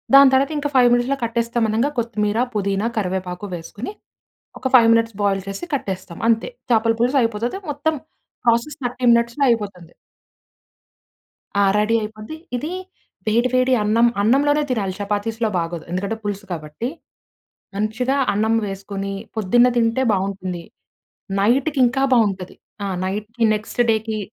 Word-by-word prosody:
దాని 275 Hz, -1 st, +9 dB
తర్వాత 270 Hz, +3 st, +3 dB
ఇంకా 290 Hz, 0 st, -1 dB
5 250 Hz, -2 st, +6 dB
మినిట్స్‌లో 245 Hz, +3 st, +1 dB
కట్టేస్తాం 235 Hz, 0 st, -1 dB
అనంగా 230 Hz, +7 st, +1 dB
కొత్తిమీర, 215 Hz, -2 st, -1 dB, 0.2 s
పుదీనా, 200 Hz, +2 st, 0 dB
కరివేపాకు 185 Hz, -1 st, -3 dB
వేసుకొని 205 Hz, -, -7 dB, 0.7 s
ఒక 260 Hz, -, -1 dB
5 230 Hz, -2 st, +7 dB
మినిట్స్ 230 Hz, -1 st, +1 dB
బాయిల్ 195 Hz, -1 st, +1 dB
చేసి 195 Hz, -, -5 dB
కట్టేస్తాం 190 Hz, -8 st, -5 dB
అంతే. 225 Hz, -, +2 dB, 0.2 s
చేపల 225 Hz, 0 st, +3 dB
పులుసు 255 Hz, +3 st, +3 dB
అయిపోతది. 230 Hz, -, -2 dB
మొత్తం 295 Hz, +2 st, -1 dB, 0.5 s
ప్రాసెస్ 235 Hz, +6 st, +1 dB
30 245 Hz, +1 st, -4 dB
మినిట్స్‌లో 235 Hz, +4 st, +1 dB
అయిపోతుంది. 200 Hz, -7 st, -2 dB, 1.7 s
ఆ! -, -, +5 dB, 0.2 s
రెడీ 210 Hz, +2 st, +2 dB
అయిపోద్ది. 215 Hz, +6 st, -7 dB, 0.2 s
ఇది 300 Hz, +7 st, -4 dB, 0.6 s
వేడి 235 Hz, +4 st, +2 dB
వేడి 255 Hz, 0 st, +3 dB
అన్నం, 225 Hz, +3 st, +4 dB
అన్నంలోనే 290 Hz, +7 st, +3 dB
తినాలి. 200 Hz, -6 st, -1 dB
చపాతీస్‌లో 215 Hz, +2 st, -1 dB
బాగోదు. 165 Hz, -1 st, -4 dB
ఎందుకంటే 195 Hz, +4 st, -2 dB
పులుసు 205 Hz, 0 st, -4 dB
కాబట్టి. 155 Hz, +7 st, -4 dB, 0.9 s
మంచిగా 220 Hz, +6 st, 0 dB, 0.2 s
అన్నం 220 Hz, +2 st, +1 dB
వేసుకొని 195 Hz, 0 st, -5 dB, 0.2 s
పొద్దున్న 225 Hz, +4 st, +4 dB
తింటే 230 Hz, +2 st, +2 dB
బాగుంటుంది. 190 Hz, -2 st, -3 dB, 0.8 s
నైట్‌కి 270 Hz, +7 st, +2 dB
ఇంకా 265 Hz, +3 st, +1 dB
బాగుంటది. 195 Hz, -5 st, 0 dB, 0.3 s
ఆ -, -, -1 dB, 0.2 s
నైట్‌, 210 Hz, +3 st, -3 dB, 0.3 s
నెక్స్ట్ 215 Hz, +3 st, -2 dB
డేకి 220 Hz, 0 st, -1 dB
225 Hz, 130 wpm, -21 LUFS, 200-245 Hz, 1.7 s, దాని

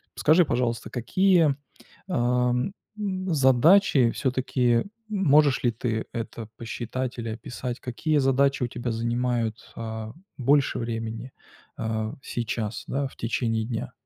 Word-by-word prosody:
скажи, 160 Hz, +4 st, +5 dB
пожалуйста, 120 Hz, -3 st, -1 dB
какие, 165 Hz, -, +3 dB, 0.5 s
эм, 125 Hz, +2 st, +1 dB, 0.3 s
м, 185 Hz, -3 st, -2 dB
задачи 135 Hz, -, +5 dB
всё-таки, 130 Hz, -2 st, +1 dB, 0.3 s
можешь 150 Hz, -8 st, +4 dB
ли 120 Hz, -, +3 dB
ты 115 Hz, -1 st, -2 dB
это 115 Hz, -1 st, -5 dB
посчитать 120 Hz, +2 st, -4 dB
или 115 Hz, -1 st, -3 dB
описать, 120 Hz, +2 st, -5 dB
какие 150 Hz, +5 st, -1 dB
задачи 135 Hz, 0 st, +2 dB
у -, -, +1 dB
тебя 120 Hz, 0 st, -4 dB
занимают, 120 Hz, 0 st, -1 dB
а, 110 Hz, -1 st, -5 dB, 0.2 s
больше 140 Hz, +2 st, +2 dB
времени, 115 Hz, +2 st, -4 dB, 0.5 s
э, 110 Hz, 0 st, -2 dB
сейчас, 115 Hz, -2 st, -3 dB
да, 140 Hz, 0 st, -1 dB
в -, -, -15 dB
течение 115 Hz, -1 st, -1 dB
дня? 115 Hz, 0 st, -4 dB
125 Hz, 120 wpm, -26 LUFS, 115-140 Hz, 0.5 s, скажи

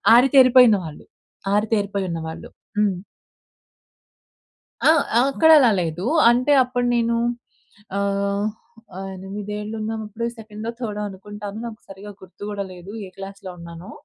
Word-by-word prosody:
ఆరితేరిపోయిన 255 Hz, -2 st, +7 dB
వాళ్ళు. 155 Hz, -2 st, -9 dB, 0.5 s
ఆరితేరిపోయి 205 Hz, -2 st, 0 dB
ఉన్నవాళ్ళు. 160 Hz, -1 st, -6 dB, 0.3 s
హ్మ్. 200 Hz, -3 st, +2 dB, 1.9 s
ఆ! -, -, +9 dB, 0.4 s
అక్కడలా 310 Hz, -4 st, +6 dB
లేదు. 170 Hz, +3 st, -3 dB, 0.2 s
అంటే 250 Hz, +4 st, +2 dB
అప్పుడు 245 Hz, -1 st, -2 dB
నేను 235 Hz, 0 st, +1 dB, 0.8 s
ఆహ్, 200 Hz, 0 st, 0 dB, 0.7 s
ఎనిమిదేళ్లున్నప్పుడు 210 Hz, +3 st, -5 dB
సెకండో, 220 Hz, 0 st, -7 dB
థర్డో 210 Hz, -4 st, -4 dB
అనుకుంటాను 205 Hz, +2 st, -8 dB
నాకు 225 Hz, -1 st, -8 dB
సరిగ్గా 200 Hz, +1 st, -10 dB
గుర్తు 190 Hz, +2 st, -15 dB
కూడా 200 Hz, -1 st, -3 dB
లేదు 180 Hz, +3 st, -10 dB
ఏ -, -, -10 dB
క్లాస్‌లో 195 Hz, -1 st, -8 dB
ఉన్నానో. 170 Hz, +1 st, -10 dB
210 Hz, 105 wpm, -22 LUFS, 195-230 Hz, 1.9 s, ఆ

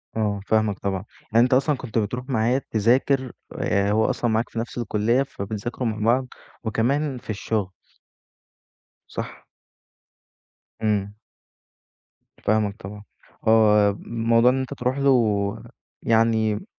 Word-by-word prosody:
آه، 105 Hz, -2 st, 0 dB
فاهمك 110 Hz, -2 st, +1 dB
طبعًا، 95 Hz, -1 st, -2 dB, 0.3 s
يعني 115 Hz, +1 st, +6 dB
أنت 125 Hz, -, +2 dB
أصلًا 140 Hz, +3 st, +3 dB
كنت 120 Hz, -3 st, -5 dB
بتروح 125 Hz, +5 st, -2 dB
معاه 125 Hz, +3 st, +1 dB
تذاكر 125 Hz, +4 st, +2 dB, 0.3 s
آآ 100 Hz, +1 st, +1 dB
هو 110 Hz, +1 st, +3 dB
أصلًا 120 Hz, -, 0 dB
معاك 110 Hz, +2 st, 0 dB
في 115 Hz, -, -5 dB
نفْس 120 Hz, +2 st, -5 dB
الكلّية 115 Hz, +3 st, +1 dB
فبتذاكروا 110 Hz, +2 st, -4 dB
مع 110 Hz, -1 st, -2 dB
بعض 130 Hz, +1 st, +1 dB, 0.4 s
وكمان 130 Hz, +5 st, 0 dB
في 120 Hz, -, -15 dB
الشُغل. 105 Hz, -2 st, -2 dB, 1.4 s
صح؟ -, -, -7 dB, 1.4 s
إمم. 105 Hz, -1 st, -1 dB, 1.3 s
فاهمك 105 Hz, -1 st, +1 dB
طبعًا، 105 Hz, +2 st, -9 dB, 0.4 s
هو 105 Hz, -2 st, +5 dB
موضوع 115 Hz, +1 st, +3 dB
إن 130 Hz, -, -1 dB
أنت 130 Hz, +1 st, -4 dB
تروح 125 Hz, +1 st, -2 dB
له 110 Hz, -7 st, +2 dB, 0.4 s
يعني 110 Hz, -, +2 dB
110 Hz, 120 wpm, -23 LUFS, 105-125 Hz, 1.4 s, يعني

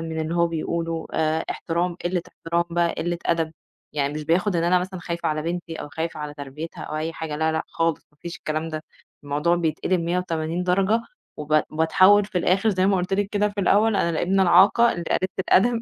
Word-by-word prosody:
من 160 Hz, -1 st, -4 dB
اللي 160 Hz, +2 st, -2 dB
هو 170 Hz, 0 st, +3 dB
بيقوله، 165 Hz, 0 st, -3 dB
آآ 160 Hz, +1 st, 0 dB
إحترام، 175 Hz, +1 st, -2 dB
قلّة 175 Hz, 0 st, 0 dB
إحترام 170 Hz, +1 st, -2 dB
بقى 170 Hz, 0 st, +1 dB
قلة 175 Hz, 0 st, -2 dB
أدب، 165 Hz, -1 st, 0 dB, 0.4 s
يعني 145 Hz, -1 st, -1 dB
مش 150 Hz, 0 st, -5 dB
بياخد 175 Hz, +4 st, +1 dB
إن 165 Hz, -, +1 dB
أنا 180 Hz, +1 st, +4 dB
مثلًا 185 Hz, 0 st, -5 dB
خايفة 170 Hz, -1 st, -3 dB
على 155 Hz, 0 st, -1 dB
بنتي 170 Hz, 0 st, -4 dB
أو -, -, -7 dB
خايفة 160 Hz, +1 st, -4 dB
على 150 Hz, 0 st, -5 dB
تربيتها 145 Hz, +3 st, -7 dB
أو -, -, -5 dB
أي 160 Hz, +2 st, -2 dB
حاجة 160 Hz, -2 st, -5 dB
،لا، 160 Hz, +1 st, +1 dB
لأ 160 Hz, +1 st, -1 dB
خالص، 165 Hz, -2 st, -1 dB
ما 150 Hz, -, -32 dB
فيش 170 Hz, +2 st, -6 dB
الكلام 155 Hz, -1 st, -3 dB
ده، 155 Hz, 0 st, -5 dB, 0.4 s
الموضوع 150 Hz, +5 st, +1 dB
بيتقلب 170 Hz, +2 st, 0 dB
180 170 Hz, -1 st, -1 dB
درجة 195 Hz, +5 st, +2 dB, 0.4 s
وب 150 Hz, 0 st, +2 dB
باتحوّل 185 Hz, +6 st, +5 dB
في 195 Hz, -2 st, -2 dB
الآخِر 190 Hz, +5 st, +2 dB
زي 185 Hz, -1 st, +1 dB
ما 195 Hz, -1 st, +3 dB
قلت 180 Hz, +1 st, -2 dB
لِك 200 Hz, 0 st, +1 dB
كده 210 Hz, 0 st, +1 dB
في 205 Hz, 0 st, -4 dB
الأول، 210 Hz, +3 st, +3 dB
أنا 170 Hz, -, +1 dB
الإبنة 185 Hz, +4 st, +1 dB
العاقة 205 Hz, +6 st, +5 dB
اللي 170 Hz, -, -5 dB
قليلة 185 Hz, -, +1 dB
الأدب، 230 Hz, +5 st, +3 dB
170 Hz, 210 wpm, -24 LUFS, 160-185 Hz, 0.4 s, باتحوّل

